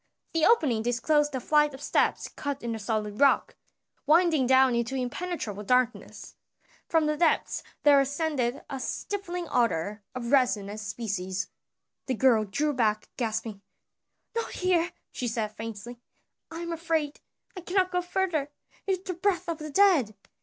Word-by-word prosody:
The 325 -1 +3
opening 290 - +3
disclosed 285 +5 +1
a - - -1
flight 300 +1 +2
of - - -11
steps - - +1
cut 285 -2 -5
in 235 - -2
the 225 - -3
solid 210 -1 -2
rock, 280 - +4 0.5
winding 315 -4 +4
down 260 0 +5
into 235 +2 -1
impenetrable 255 - -3
darkness. 250 +3 -1 0.6
From 325 -2 +3
the 300 0 +1
depths 325 +1 +1 0.2
there 285 -1 +7
ascended 275 -3 -1
a 270 - -5
stifling 355 +3 -4
odor 210 -3 0
of 235 -1 -4
resin 245 -7 +3
and 210 +1 -6
spices. 200 -3 -3 0.6
The 260 - 0
girl 230 -3 +4
drew 290 +9 -1
back 215 -4 0
gasping, 220 -3 -3 0.7
"Not 460 - -2
here!" 360 -2 +1 0.2
she 250 - -3
said 220 -2 -1
faintly. 225 +2 -8 0.5
"I 330 +1 -7
am 340 0 -3
afraid; 320 -3 -1 0.4
I 365 - -6
cannot 370 +1 +1
go 360 0 +1
further, 350 -5 -1 0.4
it - - +2
is 370 -1 -1
the 375 - -3
breath 365 +1 0
of 335 -1 -3
the 305 0 -6
dead." 300 - +4
270 Hz, 155 wpm, -27 LUFS, 230-330 Hz, 0.7 s, there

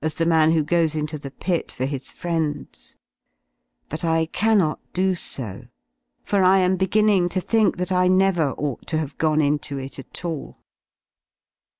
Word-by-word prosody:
« 155 0 -2
the 165 - +1
man 160 -1 +4
who 160 -2 +2
goes 160 0 +1
into 155 0 -3
thepit/or 140 -1 -3
his 135 -1 -4
friends: 160 -4 -4 0.9
but 155 - -6
I 165 -1 +2
cannot 195 -2 +1
^ - - -43
^ - - -44
do 190 +1 +2
so, 120 - -2 0.6
for 200 -2 +1
I 185 +1 +5
am 185 0 +3
beginning 190 -1 +2
to 185 - -1
think 215 +1 +1
that 180 +1 -3
I 180 0 +3
never 185 -6 +2
ought 145 -3 -4
to - - -2
'/*»// - - +2
have 145 -3 -6
gone 155 -1 +2
into 145 -1 -1
it 135 +1 -7
at 135 - -9
all. 160 -4 -5
165 Hz, 175 wpm, -23 LUFS, 150-185 Hz, 0.9 s, I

